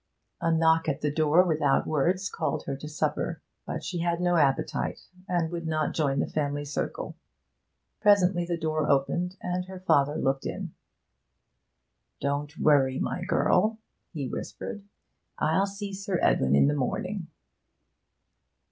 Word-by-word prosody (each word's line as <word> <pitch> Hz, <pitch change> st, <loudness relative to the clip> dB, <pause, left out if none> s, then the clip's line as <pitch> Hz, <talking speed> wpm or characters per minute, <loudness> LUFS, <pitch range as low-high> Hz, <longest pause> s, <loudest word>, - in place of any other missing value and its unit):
A 165 Hz, -1 st, +2 dB
knock 160 Hz, 0 st, +3 dB
at 140 Hz, 0 st, -2 dB
the 150 Hz, -, 0 dB
door 155 Hz, +3 st, +4 dB
without 155 Hz, -5 st, +2 dB
words 180 Hz, +6 st, +1 dB
called -, -, -2 dB
her 140 Hz, -, -3 dB
to 150 Hz, +3 st, -8 dB
supper, 155 Hz, +2 st, -1 dB, 0.3 s
but -, -, -4 dB
she 180 Hz, -, -3 dB
had 170 Hz, 0 st, 0 dB
no 175 Hz, 0 st, +2 dB
appetite, 140 Hz, -5 st, +1 dB, 0.3 s
and 175 Hz, -2 st, 0 dB
would 170 Hz, -1 st, -4 dB
not 155 Hz, -1 st, 0 dB
join 140 Hz, -4 st, +1 dB
the -, -, +2 dB
family 145 Hz, -1 st, -2 dB
circle. 145 Hz, -, -4 dB, 0.8 s
Presently 185 Hz, -4 st, +4 dB
the 170 Hz, 0 st, -2 dB
door 155 Hz, -2 st, -1 dB
opened, 175 Hz, +7 st, +1 dB
and 180 Hz, 0 st, -2 dB
her 190 Hz, 0 st, -9 dB
father 145 Hz, -6 st, +3 dB
looked 135 Hz, 0 st, 0 dB
in. -, -, -5 dB, 1.5 s
'Don't 145 Hz, +2 st, -2 dB
worry, 135 Hz, -3 st, +3 dB
my 180 Hz, -, -2 dB
girl,' 210 Hz, +3 st, +2 dB, 0.3 s
he 145 Hz, -6 st, -4 dB
whispered. 120 Hz, -, -6 dB, 0.6 s
'I'll 190 Hz, +6 st, +2 dB
see 200 Hz, 0 st, -6 dB
Sir 195 Hz, -1 st, -2 dB
Edwin 65 Hz, +1 st, +3 dB
in -, -, +6 dB
the 145 Hz, -, +3 dB
morning.' 170 Hz, +7 st, -2 dB
160 Hz, 145 wpm, -27 LUFS, 145-180 Hz, 1.5 s, in